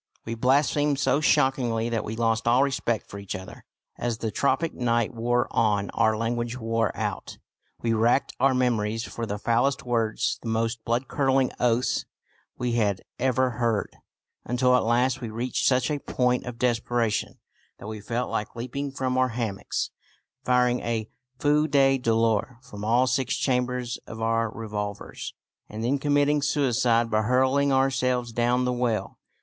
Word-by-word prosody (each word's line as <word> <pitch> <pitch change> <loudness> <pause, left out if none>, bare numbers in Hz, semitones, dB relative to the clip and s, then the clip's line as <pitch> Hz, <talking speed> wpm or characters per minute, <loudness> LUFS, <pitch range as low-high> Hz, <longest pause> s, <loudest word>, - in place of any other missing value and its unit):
We 115 - -3
blasphemed 140 +4 +2
so 140 +1 +2
shockingly 130 -6 +2
that 115 -2 -1
we 110 - -5
lost 115 0 0
all 125 +3 +5
respect 120 -5 -1
for 100 - -8
each 100 -1 -5
other. 95 0 -10 0.3
As 120 -2 -1
the 110 -1 -3
tropic 145 +8 +1
night 120 -1 0
wore 120 +2 0
on 105 -3 +1
our 110 -1 +2
language 120 +2 -2
wore 115 -2 0
out. - - -4 0.5
We 115 -1 +1
racked 115 +2 +2
our 130 +1 +3
memories 115 -3 0
for 115 -1 -5
the 105 0 -3
foulest 120 +6 +1
words, 115 -3 0
the 115 - -5
most 115 +1 -1
blood 120 +3 0
curdling 135 -2 +2
oaths 125 0 +1 0.5
we 125 -1 -1
had 105 -5 +1 0.2
ever 130 0 +2
heard, 115 -3 0 0.5
until 125 +1 +2
at - - +3
last 125 +3 +1
we 115 - -4
reached 120 +3 -1
such 130 +2 +2
a 145 - -1
point 125 -2 0
of 120 -2 -6
desperation 120 -2 0 0.4
that - - -11
we 110 0 -6
felt 120 +3 -3
like 105 +3 -3
leaping 130 +4 -4
from 130 -1 -1
our 130 0 +3
hammocks, 115 -5 -3 0.5
firing 125 -1 +2
a 115 -2 -3 0.3
feu 150 +3 +2
de 135 -2 +3
douleur 115 0 +1
from 105 -4 -9
all 120 +4 +3
six 130 0 0
chambers 125 -2 -1
of 110 - -8
our 115 0 +1
revolvers, 105 -2 -6 0.3
and 110 +1 -6
then 135 +4 +1
committing 145 +1 +2
suicide 120 -5 +2
by 110 0 +3
hurling 130 +4 +2
ourselves 130 -2 +1
down 120 +2 +1
the 125 - 0
well. 120 -3 -2
120 Hz, 160 wpm, -26 LUFS, 115-130 Hz, 0.5 s, all